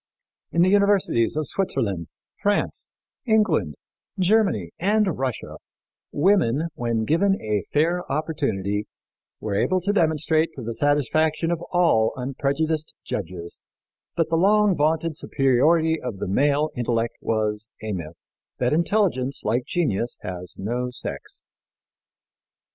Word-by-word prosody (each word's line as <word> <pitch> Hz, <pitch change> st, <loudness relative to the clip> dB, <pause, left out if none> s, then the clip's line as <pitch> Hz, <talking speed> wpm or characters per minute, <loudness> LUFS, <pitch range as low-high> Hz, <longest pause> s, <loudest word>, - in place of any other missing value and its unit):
In 170 Hz, -, +3 dB
the 185 Hz, -, +4 dB
universities 200 Hz, -, +3 dB
of 155 Hz, -, 0 dB
Switzerland, 100 Hz, -, -2 dB, 0.3 s
France, 205 Hz, 0 st, 0 dB, 0.4 s
England, 210 Hz, -, +2 dB, 0.4 s
Germany 185 Hz, -, +2 dB
and 205 Hz, -1 st, +2 dB
Russia 130 Hz, -4 st, -3 dB, 0.5 s
women, 165 Hz, -, +2 dB
when 115 Hz, -4 st, -1 dB
given 195 Hz, -, +2 dB
a 105 Hz, -2 st, -2 dB
fair 170 Hz, +3 st, +1 dB
opportunity, 110 Hz, -, -1 dB, 0.5 s
were 105 Hz, -2 st, -3 dB
able 185 Hz, -, +2 dB
to 200 Hz, +3 st, 0 dB
demonstrate 160 Hz, -2 st, +2 dB
to 130 Hz, -, -7 dB
the 115 Hz, +1 st, -3 dB
satisfaction 150 Hz, +5 st, +1 dB
of 170 Hz, -1 st, -1 dB
all 165 Hz, -12 st, +3 dB
unprejudiced 140 Hz, +4 st, -2 dB
judges 85 Hz, -3 st, -5 dB, 0.6 s
that 165 Hz, -2 st, +1 dB
the 165 Hz, -, +3 dB
long 205 Hz, +2 st, +4 dB
vaunted 155 Hz, +1 st, +1 dB
superiority 155 Hz, +4 st, +2 dB
of 125 Hz, -5 st, -5 dB
the -, -, -4 dB
male 145 Hz, +9 st, +2 dB
intellect 115 Hz, -1 st, -1 dB
was 110 Hz, -1 st, -1 dB, 0.2 s
a 110 Hz, -, -3 dB
myth; 85 Hz, -4 st, -5 dB, 0.4 s
that 125 Hz, +2 st, +1 dB
intelligence, 165 Hz, -6 st, +1 dB
like 120 Hz, +4 st, +1 dB
genius, 120 Hz, -, -1 dB
has 90 Hz, -1 st, -6 dB
no 120 Hz, +5 st, -2 dB
sex. 125 Hz, -, -6 dB
145 Hz, 120 wpm, -24 LUFS, 115-170 Hz, 0.6 s, the